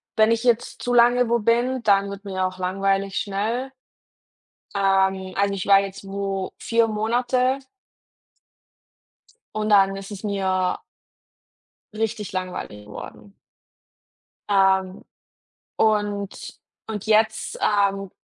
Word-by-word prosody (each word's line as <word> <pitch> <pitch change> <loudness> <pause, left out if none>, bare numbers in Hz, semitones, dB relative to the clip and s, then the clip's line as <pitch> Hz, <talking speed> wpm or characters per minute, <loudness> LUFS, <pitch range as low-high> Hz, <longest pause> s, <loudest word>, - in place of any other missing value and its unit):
wenn 220 +1 +4
ich 230 +1 +1
jetzt 240 -2 0
zu 245 - -1
lange 245 0 +5
wo 235 0 +2
bin, 240 +3 +1
dann 200 -1 +3
wird 200 +1 -9
mir 190 -1 -1
auch 185 0 -8
langweilig 195 +1 -1
schnell. 220 +7 -2 1.0
Ähm, 190 -1 +1
also 200 0 +1
ich 190 - -4
war 195 -1 +7
jetzt 195 0 -6
wo 195 -1 -3
4 230 -1 +2
Monate. 245 +4 +1 2.0
Und 215 0 -1
dann 195 -1 +5
ist 195 +1 -8
es 205 0 -8
mir 190 -2 0 1.2
richtig 220 -1 -3
langweilig 180 - -5
geworden. 195 - -11 1.1
Ähm, 190 -1 +2 0.7
und 205 -2 -1 0.3
und 210 -3 -5
jetzt, 220 0 +1
ähm, 195 -2 +1
200 Hz, 110 wpm, -23 LUFS, 195-220 Hz, 2.0 s, war